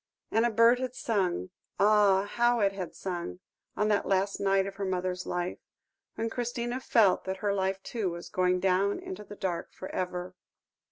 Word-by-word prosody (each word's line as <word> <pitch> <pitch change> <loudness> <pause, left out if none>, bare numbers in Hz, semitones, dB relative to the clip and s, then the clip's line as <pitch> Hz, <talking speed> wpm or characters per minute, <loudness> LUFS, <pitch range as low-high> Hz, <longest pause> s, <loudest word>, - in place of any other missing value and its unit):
And 225 +2 +3
a - - +1
bird 230 +2 +5
had 255 -1 -3
sung 185 - -1 0.3
ah! 205 -2 +5
how 240 +3 +2
it 200 -2 +3
had 185 -4 -6
sung, 180 -1 -4 0.4
on 210 - +2
that 205 -1 +1
last 195 +1 +1
night 195 -1 +2
of 195 0 -7
her 200 - -3
mother's 185 -1 -2
life, 175 0 -2 0.6
when 225 - -1
Christina 240 +1 -3
felt 220 -7 +3
that 190 0 -3
her 205 -1 0
life 195 0 -1
too 220 -6 -2
was 170 0 -7
going 180 0 +1
down 190 +2 +2
into 195 +3 -7
the 205 - -10
dark 175 -4 -3
for 190 - -8
ever. 180 0 -3
195 Hz, 180 wpm, -29 LUFS, 185-215 Hz, 0.6 s, bird